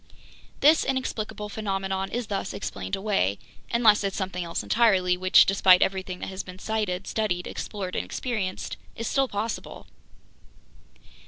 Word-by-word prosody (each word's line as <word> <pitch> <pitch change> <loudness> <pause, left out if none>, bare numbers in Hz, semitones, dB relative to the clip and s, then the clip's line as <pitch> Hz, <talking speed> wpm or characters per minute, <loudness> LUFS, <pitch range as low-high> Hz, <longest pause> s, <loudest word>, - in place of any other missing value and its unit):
"This 310 +2 +6
inexplicable 220 -5 -3
phenomenon 195 -2 -2
is 240 0 -3
thus 195 -2 -3
explained 200 - -4
away—unless 205 - +1
it's 195 -1 -2
something 185 -2 -3
else 170 -1 -3
entirely, 190 -6 +3
which, 185 +1 +6
despite 190 -2 +5
everything 190 -1 -2
that - - -4
has 190 0 -4
been 180 0 -11
sighted, 200 -3 -2
studied, 185 -5 -1
explored 190 -4 -5
and - - 0
experienced, 210 -7 -3 0.2
is 230 - -4
still 270 -1 +2
possible!" 215 0 -4
195 Hz, 135 wpm, -26 LUFS, 185-220 Hz, 0.2 s, This